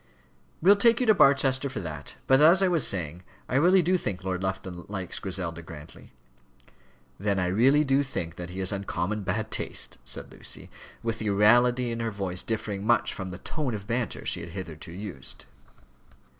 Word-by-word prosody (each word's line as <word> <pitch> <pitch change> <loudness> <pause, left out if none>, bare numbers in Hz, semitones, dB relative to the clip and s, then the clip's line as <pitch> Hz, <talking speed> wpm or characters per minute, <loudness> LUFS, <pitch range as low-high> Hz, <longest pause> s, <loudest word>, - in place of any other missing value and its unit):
"We'll 200 +3 +7
take 230 +3 +4
you 250 - +1
to 220 - +6
Barchester 140 -4 +4
for 130 - -5
that. 75 -4 -7
But 135 +1 +5
as 170 +5 +7
I - - +4
was 170 -6 +3
saying, 85 -2 -2 0.3
I - - -6
really 175 +7 +5
do 185 +3 +2
think 95 - -4
Lord 95 -1 -2
Lufton 95 -2 -4
likes 95 -3 -4
Griselda 90 -3 -3
Grantly." 80 -2 -12 1.1
"Then 100 0 0
I 90 - +1
really 125 +11 +4
do 135 -1 +2
think 95 - -4
that 90 0 -7
he 90 - -8
has 95 +1 0
uncommon 100 +1 -2
bad 105 +3 -2
taste," - - -2
said 65 +1 -6
Lucy, - - -5 0.3
with 115 -1 -3
a 110 - -1
reality 120 +4 +4
in 115 - -4
her 115 0 -1
voice 95 -4 -2
differing 105 -3 -3
much 120 +2 +2
from 95 -3 -6
the 90 - -7
tone 135 - -3
of 100 -1 -7
banter 120 +2 -3
she - - +1
had 85 - -7
hitherto 85 -4 -7
used. 100 +2 -7
105 Hz, 185 wpm, -27 LUFS, 90-130 Hz, 1.1 s, We'll